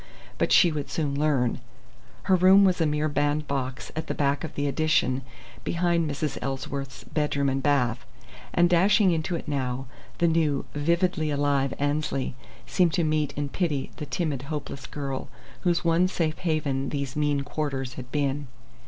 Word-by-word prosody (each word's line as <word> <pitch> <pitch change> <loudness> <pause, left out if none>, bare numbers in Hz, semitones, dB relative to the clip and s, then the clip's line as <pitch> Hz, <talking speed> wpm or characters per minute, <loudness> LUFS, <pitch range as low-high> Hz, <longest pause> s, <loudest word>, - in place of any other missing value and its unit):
But - - +1
she 175 - +6
would 145 -2 -4
soon 145 0 -1
learn. 140 -6 +1 0.6
Her 190 - +4
room 190 +2 +7
was 180 -2 +2
a 160 - +3
mere 150 +1 0
bandbox 145 -3 -1
at 160 - -3
the - - -2
back 140 0 +1
of 160 - -6
the 145 - -1
"addition," 140 -3 +2 0.4
behind 170 -2 +1
Mrs. 145 0 -3
Ellsworth's 135 -1 -4
bedroom 145 -2 0
and 135 0 -1
bath; 125 -5 +1 0.5
and 175 0 +4
dashing 190 +3 +4
into 165 +2 -1
it 165 - -6
now, 135 -2 -2 0.3
the 170 - +3
new, 160 -4 +1
vividly 165 +1 +1
alive 140 -2 +1
Annesley 145 -2 -1 0.3
seemed 175 -4 +2
to 170 - +2
meet 155 -2 +1
and 145 -1 -3
pity 155 -7 -1
the 150 - -6
timid, 150 -7 -1
hopeless 145 -3 -5
girl 135 -2 -4 0.3
whose 175 -1 +1
one 170 +2 +4
safe 160 -4 -1
haven 150 -6 -1
these 140 -2 -3
mean 145 -1 +1
quarters 140 -3 -3
had 130 -1 -9
been. 145 -1 -1
145 Hz, 160 wpm, -26 LUFS, 140-165 Hz, 0.6 s, room